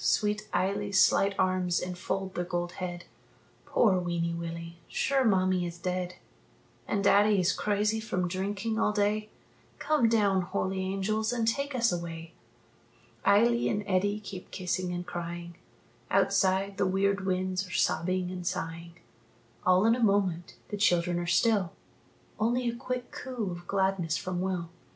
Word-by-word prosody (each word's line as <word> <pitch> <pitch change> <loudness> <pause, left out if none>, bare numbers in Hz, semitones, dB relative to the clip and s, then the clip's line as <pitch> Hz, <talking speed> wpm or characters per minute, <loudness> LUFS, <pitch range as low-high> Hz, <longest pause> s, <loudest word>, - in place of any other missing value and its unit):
Sweet 210 0 +1
Eily's 200 +1 +1
slight 195 +1 +4
arms 185 -1 +1
enfold 185 +1 -3
the 175 - -2
gold 175 0 -2
head: 175 -1 -4 0.6
"Poor 195 -6 +3
weeny 170 -1 -1
Willie, 170 0 -6
sure 275 -1 +1
mammie 185 -4 +2
is 170 0 -7
dead 180 +1 -3 0.7
And 200 -1 0
daddie 205 0 +5
is 180 +1 +2
crazy 210 +1 0
from 185 -5 -1
drinking 200 +4 -2
all 210 - +2
day 210 +1 0 0.5
Come 300 -7 +2
down, 200 -4 +3
holy 190 +1 -2
angels, 195 +4 -1
and 230 -2 0
take 280 +4 0
us 235 -2 +3
away!" 170 -1 -5 0.9
Eily 235 +4 +4
and 210 0 -1
Eddie 200 +2 +1
keep 195 -3 -9
kissing 180 -1 -2
and 175 0 -4
crying 170 0 -6 0.5
Outside, 195 0 +2
the 195 - +2
weird 195 +1 +1
winds 185 0 -1
are - - -12
sobbing 180 +3 0
and 180 -1 -5
sighing. 170 0 -4 0.7
All 185 +2 +5
in 225 - +5
a 245 - -1
moment 190 -5 +1
the 205 - -3
children 175 -3 +2
are 175 - -3
still, 190 +1 +2 0.7
Only 240 +3 +1
a 235 - -1
quick 250 +1 -4
coo 245 -7 -4
of 175 0 -8
gladness 190 -4 +1
from 180 -1 -3
Will. 180 -3 -2
190 Hz, 150 wpm, -29 LUFS, 175-210 Hz, 0.9 s, daddie